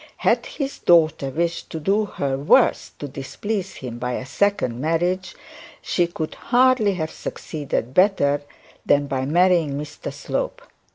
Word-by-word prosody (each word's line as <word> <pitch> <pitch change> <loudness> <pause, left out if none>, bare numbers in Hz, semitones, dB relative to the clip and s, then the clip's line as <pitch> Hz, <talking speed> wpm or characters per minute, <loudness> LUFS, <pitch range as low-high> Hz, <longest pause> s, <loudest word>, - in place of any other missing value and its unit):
Had - - +1
his 275 -2 -5
daughter 160 -5 +4
wished 170 +5 -2
to 160 - -5
do 200 +7 +1
her 140 -8 -2
worst 140 +2 +3
to 145 - -6
displease 190 +9 -4
him 120 -2 -7
by 125 0 -2
a 130 - -4
second 135 -10 0
marriage, 175 +4 0 0.4
she 175 -1 0
could 160 -2 -5
hardly 245 -5 +3
have 160 -2 -3
succeeded 140 -5 -4
better 145 -7 +3 0.4
than 145 0 +3
by 135 -1 -2
marrying 170 -2 +3
Mr 145 +1 -6
Slope. - - -4
160 Hz, 145 wpm, -22 LUFS, 140-195 Hz, 0.4 s, daughter